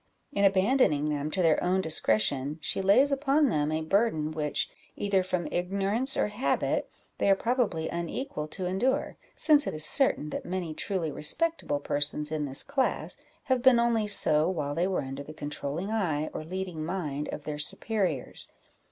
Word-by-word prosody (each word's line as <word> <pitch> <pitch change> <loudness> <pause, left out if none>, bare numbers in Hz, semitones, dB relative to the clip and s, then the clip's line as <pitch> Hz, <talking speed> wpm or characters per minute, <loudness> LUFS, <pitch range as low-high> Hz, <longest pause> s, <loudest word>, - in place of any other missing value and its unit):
In 200 - -1
abandoning 190 - +3
them 150 0 -2
to 185 +3 0
their 160 -2 +3
own 185 +2 +1
discretion, 140 -3 +1
she 155 - -2
lays 205 +9 +4
upon 280 +1 +2
them 150 -5 0
a 160 0 -2
burden 160 -4 0
which, 150 -2 -1 0.3
either 200 -2 +1
from 180 -2 -2
ignorance 200 +8 0
or - - +1
habit, 210 +6 -1 0.3
they - - +2
are 195 - +6
probably 225 -8 -1
unequal 170 - -4
to 185 +4 -5
endure, 195 +9 -1 0.2
since 295 -3 +4
it - - -3
is 155 0 0
certain 155 - +3
that - - -4
many 180 -3 -4
truly 170 -1 -3
respectable 315 - -1
persons 145 +1 -1
in 155 -2 -2
this 135 -1 +4
class 280 -2 -2 0.3
have 260 -2 0
been 255 -2 +5
only 230 -2 +1
so 155 -5 +6
while 150 -6 -3
they 170 +4 0
were 190 -5 -1
under 135 +1 -6
the 155 +2 -10
controlling 150 +6 -5
eye 160 -9 -1
or - - -5
leading 180 -1 -5
mind 155 -4 -4
of 150 - -6
their 150 0 -5
superiors. 180 - -2
180 Hz, 170 wpm, -28 LUFS, 150-210 Hz, 0.3 s, are